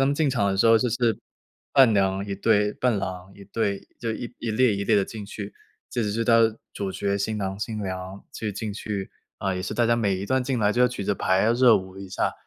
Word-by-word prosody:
他 135 - +4
们 140 - +1
进 150 -2 +1
场 120 -6 +1
的 95 - 0
时 110 +4 +4
候 115 0 +7
就 125 - +1
是。 115 -1 +1 0.6
伴 130 -4 +8
娘 95 -1 +1
1 100 - -3
队， 105 +1 +2
伴 125 -3 +1
郎 95 -1 -5
1 100 - -13
队， 100 0 -2
就 115 - -2
1- 120 +2 -5
1 115 - -3
列 115 0 +3
1 100 - -2
列 105 +1 +3
地 100 - +3
进 105 -1 -8
去， 100 0 -7 0.4
这 120 - -1
只 105 - -1
是 115 +2 -1
他 115 -1 +5 0.3
主 100 -1 -3
角 100 +1 -1
新 110 +2 -1
郎 95 -1 -3
新 110 -1 -3
娘 95 0 -6
就 110 - -3
进 105 +1 -4
去 100 -1 -5 0.3
啊， 95 -1 -2
也 90 - -3
是 90 - -4
大 120 - +2
家 115 0 +3
每 105 -5 +1
一 95 - -4
段 130 +4 +1
进 130 -1 -1
来 105 -1 +2
就 120 - 0
要 125 - +6
举 120 -5 -5
牌， 95 -1 +1
要 115 - +3
热 120 -1 +6
舞 95 0 -7
一 95 -1 -8
下。 95 - -1
105 Hz, 255 characters per minute, -25 LUFS, 100-115 Hz, 0.6 s, 伴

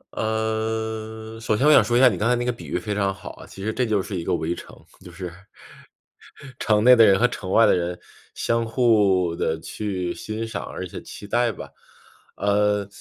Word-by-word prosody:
呃， 110 0 -3
首 110 -1 0
先 135 - +1
我 155 - +7
想 - - +7
说 120 - +1
一 - - +4
下 130 - +8
你 100 -8 0
刚 105 - +1
才 125 - +4
那 120 0 -2
个 125 - +1
比 115 - -10
喻 - - -2
非 105 +4 -3
常 100 -1 0
好 95 - -9
啊， - - -13
其 95 - -10
实 110 +2 -2
这 125 - 0
就 110 -3 +1
是 95 +1 -4
一 85 - -3
个 - - 0
围 80 +2 -2
城， - - -11 0.3
就 90 - -11
是 90 0 -7 1.3
城 105 -1 +2
内 125 +1 +8
的 115 - +7
人 95 -2 +5
和 125 - +5
城 95 -6 -6
外 115 - +6
的 - - +4
人 90 0 -3 0.4
相 115 0 0
互 105 -8 +2
地 80 -1 -1
去 95 -2 -4
欣 110 +1 -5
赏， 110 - -5
而 - - -6
且 - - -8
期 - - -10
待 120 +2 +1
吧。 85 - -9 0.7
呃， 105 0 +1
110 Hz, 235 characters per minute, -23 LUFS, 95-115 Hz, 1.3 s, 下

